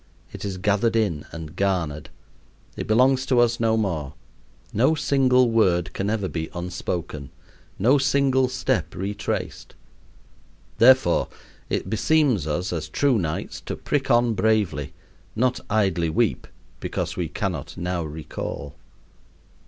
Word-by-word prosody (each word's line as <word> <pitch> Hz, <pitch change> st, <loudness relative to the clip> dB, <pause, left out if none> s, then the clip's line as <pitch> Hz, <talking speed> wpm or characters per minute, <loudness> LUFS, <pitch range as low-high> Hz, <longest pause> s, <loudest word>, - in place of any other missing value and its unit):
It -, -, -8 dB
is 100 Hz, -2 st, -3 dB
gathered 105 Hz, +4 st, +1 dB
in 95 Hz, -10 st, 0 dB
and 80 Hz, -1 st, -8 dB
garnered. 85 Hz, -7 st, -1 dB, 0.7 s
It -, -, -5 dB
belongs 130 Hz, +4 st, +4 dB
to 125 Hz, -3 st, +3 dB
us 120 Hz, -1 st, +3 dB
no 115 Hz, -1 st, +2 dB
more. 80 Hz, -10 st, -2 dB, 0.6 s
No 130 Hz, +9 st, +3 dB
single 130 Hz, -4 st, +3 dB
word 95 Hz, -5 st, +2 dB
can 100 Hz, +1 st, -2 dB
ever 105 Hz, -3 st, -1 dB
be 80 Hz, -3 st, -4 dB
unspoken; 85 Hz, -4 st, -4 dB, 0.5 s
no 130 Hz, +8 st, +4 dB
single 135 Hz, -1 st, +2 dB
step -, -, -1 dB
retraced. 100 Hz, +3 st, -4 dB, 1.0 s
Therefore 125 Hz, -7 st, +5 dB, 0.4 s
it -, -, -1 dB
beseems 115 Hz, -, +2 dB
us 90 Hz, +4 st, -2 dB
as 80 Hz, -2 st, -4 dB
true 130 Hz, -, +2 dB
knights 80 Hz, -4 st, -4 dB
to -, -, -5 dB
prick 140 Hz, -2 st, -2 dB
on 120 Hz, -1 st, +4 dB
bravely, 105 Hz, -10 st, 0 dB, 0.4 s
not 125 Hz, +2 st, +1 dB
idly 95 Hz, -6 st, +1 dB
weep 80 Hz, -, 0 dB, 0.3 s
because -, -, -3 dB
we -, -, -2 dB
cannot -, -, -4 dB
now 90 Hz, 0 st, -2 dB
recall. 75 Hz, -2 st, -6 dB
105 Hz, 130 wpm, -24 LUFS, 85-125 Hz, 1.0 s, Therefore